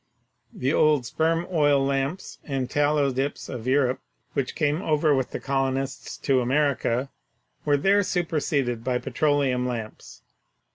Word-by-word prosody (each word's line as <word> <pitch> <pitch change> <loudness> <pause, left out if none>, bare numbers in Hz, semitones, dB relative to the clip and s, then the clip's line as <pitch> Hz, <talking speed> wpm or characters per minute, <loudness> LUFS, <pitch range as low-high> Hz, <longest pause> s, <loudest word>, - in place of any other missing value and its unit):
The 135 +4 -1
old 150 -5 +3
sperm 165 +6 0
oil 145 -4 +3
lamps 140 +6 -2
and 135 -3 -2
tallow 145 0 +2
dips 135 +3 -3
of 125 -2 -6
Europe 130 -1 +2 0.3
which 135 -2 -2
came 150 +1 0
over 155 -3 +2
with 130 -2 0
the - - -5
colonists 135 0 -2
to 135 -2 +1
America 135 -1 0 0.5
were 145 -1 +3
there 195 +7 +3
superseded 145 - -1
by 125 0 0
petro 145 +3 0
leum 125 -3 0
lamps. 115 -3 -7
140 Hz, 140 wpm, -25 LUFS, 130-150 Hz, 0.5 s, old